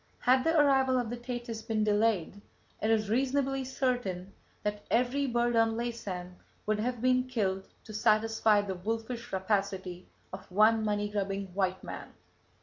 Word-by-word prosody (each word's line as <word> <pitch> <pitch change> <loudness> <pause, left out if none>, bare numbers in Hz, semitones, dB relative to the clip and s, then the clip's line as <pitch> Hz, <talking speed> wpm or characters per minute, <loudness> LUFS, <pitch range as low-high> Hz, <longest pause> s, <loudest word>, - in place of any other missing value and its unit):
Had 255 +1 +4
the 325 -1 +3
arrival 265 -3 +4
of 240 -2 -1
the - - -2
Thetis 240 -2 -5
been 220 -1 -1
delayed, 205 -3 +1 0.4
it 215 - +1
is 220 -2 +2
reasonably 270 +3 +1
certain 245 -8 -2 0.3
that 210 0 -2
every 255 +4 +1
bird 240 -1 +1
on 225 0 +3
Laysan 190 -7 -5 0.3
would 215 0 0
have 245 +1 -2
been 255 0 +3
killed 195 -6 -1 0.2
to 215 - -10
satisfy 215 0 +3
the 195 -2 -3
wolfish 225 +5 -4
rapacity 190 -2 -2 0.3
of 190 0 -9
one 215 +3 +4
money 205 -1 0
grubbing 195 -2 -3
white 190 -1 -1
man. - - -8
220 Hz, 150 wpm, -30 LUFS, 200-245 Hz, 0.4 s, Had